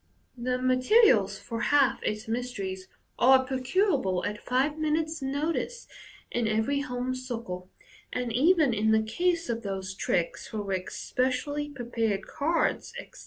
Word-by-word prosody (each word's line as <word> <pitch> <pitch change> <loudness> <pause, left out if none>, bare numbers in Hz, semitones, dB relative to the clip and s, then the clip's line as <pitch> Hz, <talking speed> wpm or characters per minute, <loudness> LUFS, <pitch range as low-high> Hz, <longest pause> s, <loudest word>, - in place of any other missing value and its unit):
The 250 +1 -1
materials 255 - +4
for 230 +3 -5
half 275 -2 +3
its 215 +2 -3
mysteries 200 -6 -4 0.3
are 260 +1 +6
procurable 260 - +1
at 210 0 -4
five 275 +5 0
minutes' 315 0 0
notice 310 - -2 0.4
in 235 -2 0
every 220 +6 +1
home 255 -2 -2
circle 230 -8 -6 0.4
j - - -2
and, 235 -2 -4
even 305 +1 +4
in 220 0 +1
the 220 0 +3
case 340 +9 0
of 230 -1 -2
those 190 -2 -4
tricks 175 -2 -1
for 215 -2 -4
which 190 -2 -3
specially 275 +4 -1
prepared 235 -6 -2
cards, 330 +9 -1
etc. - - -12
250 Hz, 140 wpm, -28 LUFS, 215-290 Hz, 0.4 s, are